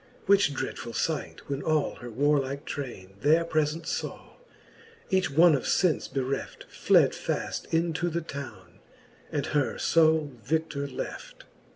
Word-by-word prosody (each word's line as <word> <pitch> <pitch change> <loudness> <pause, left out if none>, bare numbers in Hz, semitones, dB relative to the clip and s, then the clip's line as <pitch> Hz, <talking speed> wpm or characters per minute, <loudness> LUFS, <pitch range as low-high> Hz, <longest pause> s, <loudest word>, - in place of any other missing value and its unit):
Which 195 -7 +4
dreadfuU 115 -3 -4
fight 160 -3 -2
when 140 0 -3
all 155 -2 0
her 120 - -8
warlike 140 +2 0
traine 100 -9 -6
There 160 +3 +4
prefent 155 0 0
faw, - - -5 0.7
each 190 -3 +2
one 165 +4 +6
of 135 - 0
fence 180 -5 +2
bereft 135 0 -3
Fled - - +4
faft - - -4
into 165 +1 +1
the 170 +1 -2
towne, 130 - -9 0.5
and 145 -2 -1
her 145 -3 0
fole 160 -2 +3
vi6i:or 150 +1 -1
left. 135 - -7
150 Hz, 135 wpm, -28 LUFS, 135-160 Hz, 0.7 s, one